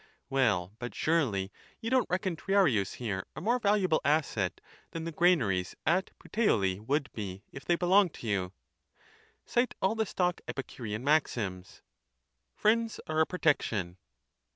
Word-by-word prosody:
Well, 105 Hz, -9 st, +1 dB
but 120 Hz, -3 st, -6 dB
surely 115 Hz, -13 st, +1 dB, 0.3 s
you 230 Hz, -, -4 dB
don't 255 Hz, -4 st, +3 dB
reckon 185 Hz, 0 st, -1 dB
Triarius 160 Hz, -, +2 dB
here 100 Hz, -6 st, -4 dB
a -, -, -5 dB
more 235 Hz, +9 st, +1 dB
valuable 200 Hz, -6 st, +2 dB
asset 135 Hz, -, +1 dB, 0.3 s
than 165 Hz, -, -5 dB
the 165 Hz, -, -4 dB
granaries 125 Hz, -, +2 dB
at 180 Hz, +5 st, +2 dB
Puteoli 100 Hz, -, +1 dB
would 140 Hz, +6 st, -1 dB
be 100 Hz, -2 st, -6 dB
if 135 Hz, -, -10 dB
they 175 Hz, -, +3 dB
belonged 180 Hz, +1 st, +3 dB
to -, -, -10 dB
ynu? 95 Hz, -4 st, -1 dB, 0.9 s
Cite 240 Hz, +1 st, +1 dB
all 190 Hz, +3 st, +2 dB
the 220 Hz, -1 st, -1 dB
stock 180 Hz, -1 st, 0 dB
Epicurean 120 Hz, -4 st, -5 dB
maxims. 115 Hz, -11 st, 0 dB, 0.7 s
Friends 225 Hz, +1 st, +1 dB
are 155 Hz, 0 st, -1 dB
a 160 Hz, -, +4 dB
pro 180 Hz, -, -5 dB
tection.' 105 Hz, -, +1 dB
150 Hz, 145 wpm, -30 LUFS, -, 0.9 s, a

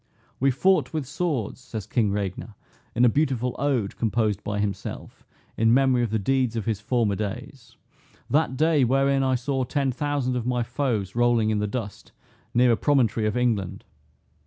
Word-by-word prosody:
"We 135 Hz, -, +3 dB
fought 185 Hz, +8 st, +2 dB
with 155 Hz, -3 st, -2 dB
swords," 135 Hz, -, -2 dB
says 110 Hz, -5 st, -7 dB
King 110 Hz, -5 st, +1 dB
Regner, 100 Hz, +2 st, -4 dB, 0.4 s
in 120 Hz, +2 st, +4 dB
a -, -, +7 dB
beautiful 125 Hz, -2 st, 0 dB
ode 130 Hz, -8 st, -1 dB
composed 110 Hz, -3 st, 0 dB
by 105 Hz, 0 st, -3 dB
himself, 100 Hz, -1 st, -5 dB, 0.3 s
in 115 Hz, +1 st, +4 dB
memory 130 Hz, -2 st, +3 dB
of 120 Hz, -, 0 dB
the 110 Hz, -, 0 dB
deeds 125 Hz, +2 st, 0 dB
of 110 Hz, -3 st, -3 dB
his 110 Hz, -3 st, -2 dB
former 110 Hz, -3 st, +1 dB
days, 100 Hz, -1 st, -6 dB, 0.5 s
"that 140 Hz, -3 st, +1 dB
day 155 Hz, -2 st, +3 dB
wherein 135 Hz, +2 st, +2 dB
I 130 Hz, -1 st, +2 dB
saw 130 Hz, +2 st, -1 dB
ten 135 Hz, +1 st, 0 dB
thousand 135 Hz, -1 st, -1 dB
of 120 Hz, -1 st, -2 dB
my 125 Hz, -1 st, 0 dB
foes 120 Hz, -6 st, -2 dB
rolling 120 Hz, -2 st, +2 dB
in 105 Hz, -, 0 dB
the 105 Hz, -, -1 dB
dust, 105 Hz, -2 st, -6 dB, 0.4 s
near 125 Hz, 0 st, +4 dB
a 115 Hz, -, +2 dB
promontory 120 Hz, -7 st, +2 dB
of 105 Hz, -, -1 dB
England. 100 Hz, -6 st, -1 dB
120 Hz, 175 wpm, -25 LUFS, 110-135 Hz, 0.5 s, a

